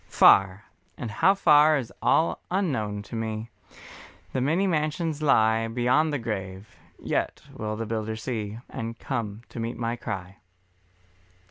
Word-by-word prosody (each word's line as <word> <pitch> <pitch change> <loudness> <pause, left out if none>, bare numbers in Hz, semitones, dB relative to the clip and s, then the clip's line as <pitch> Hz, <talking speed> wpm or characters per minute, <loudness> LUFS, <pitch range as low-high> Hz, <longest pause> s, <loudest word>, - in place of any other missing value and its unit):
Far, 95 +1 +5 0.3
and 115 - -5
how 185 - +4
far 155 -4 +5
is 125 -5 -5
all 165 - +2
unknown 120 - -1
to 105 - -9
me, 110 0 -4 0.8
The 130 - 0
many 165 +9 +2
mansions 155 -2 -1
lie 115 -6 +3
Beyond 125 +7 +2
the 145 - 0
grave, 100 -4 -5 0.2
yet - - -2
will 110 0 -4
the 115 +1 -4
Builder 110 0 -3
see 110 -2 -4
And 115 +1 -6
come 115 -4 -4
to - - -8
meet 115 +1 -3
my 115 0 -2
cry. 95 -4 -6
115 Hz, 140 wpm, -26 LUFS, 110-150 Hz, 0.8 s, Far